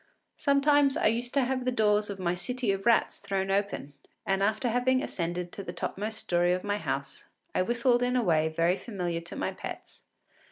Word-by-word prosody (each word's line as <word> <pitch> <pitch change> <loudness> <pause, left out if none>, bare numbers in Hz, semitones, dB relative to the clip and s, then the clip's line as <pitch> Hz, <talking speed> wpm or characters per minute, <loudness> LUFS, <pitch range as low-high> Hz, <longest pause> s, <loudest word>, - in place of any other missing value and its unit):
Sometimes 280 0 +3
I - - 0
used 235 +3 +1
to 275 - +4
have 255 0 -1
the 255 - 0
doors 210 -3 +2
of 200 - -4
my 175 -2 0
City 235 +5 -1
of 195 +2 -2
Rats 235 - +3
thrown 195 -1 -2
open, 200 -7 -1 0.3
and, 195 0 +1
after 215 +4 +1
having 255 +3 +2
ascended 175 0 -3
to 200 - -7
the - - -6
topmost 215 +2 -4
story 175 -3 +1
of 185 - -2
my 205 0 -1
house, - - -4 0.3
I - - +2
whistled 240 +4 +2
in 250 0 +1
a 250 - +2
way 160 -5 +3
very 165 +3 +1
familiar 175 -7 -3
to 170 - -10
my - - -2
pets. - - -9
205 Hz, 200 wpm, -29 LUFS, 180-245 Hz, 0.3 s, to